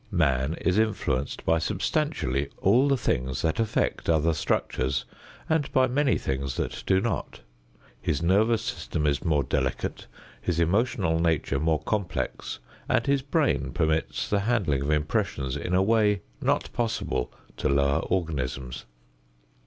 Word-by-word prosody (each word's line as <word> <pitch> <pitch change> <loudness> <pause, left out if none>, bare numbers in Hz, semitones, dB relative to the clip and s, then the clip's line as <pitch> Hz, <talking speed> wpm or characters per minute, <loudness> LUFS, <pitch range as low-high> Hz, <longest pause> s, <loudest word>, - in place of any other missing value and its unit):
Man 75 - +1
is 90 +4 +1
influenced 70 -11 -1
by 80 - +3
substantially 90 - -1
all 120 +8 +4
the 140 -1 +3
things 65 - -1
that 80 +5 0
affect 110 -5 0
other 80 0 +3
structures 70 -3 -1 0.4
and 160 -3 +1
by 130 - +4
many 135 +2 +2
things 65 -1 -3
that - - -3
do 95 - +4
not. 95 - -3 0.6
His 75 - 0
nervous 110 +6 +3
system 80 -9 -3
is 70 -1 +1
more 75 -4 +2
delicate, 65 -1 -2 0.3
his 85 -2 -1
emotional 90 -2 +1
nature 80 -4 +1
more 80 0 +1
complex, 100 -5 -2 0.3
and 115 - +2
his 140 -1 +2
brain 135 - 0
permits 80 -1 0
the 105 - +1
handling 100 - +1
of 70 - -2
impressions 75 - 0
in 90 - -1
a 95 - +4
way 105 -2 +3 0.2
not - - 0
possible 110 - -1 0.3
to - - 0
lower 70 +1 +3
organisms. 70 -9 -3
85 Hz, 140 wpm, -26 LUFS, 70-110 Hz, 0.6 s, all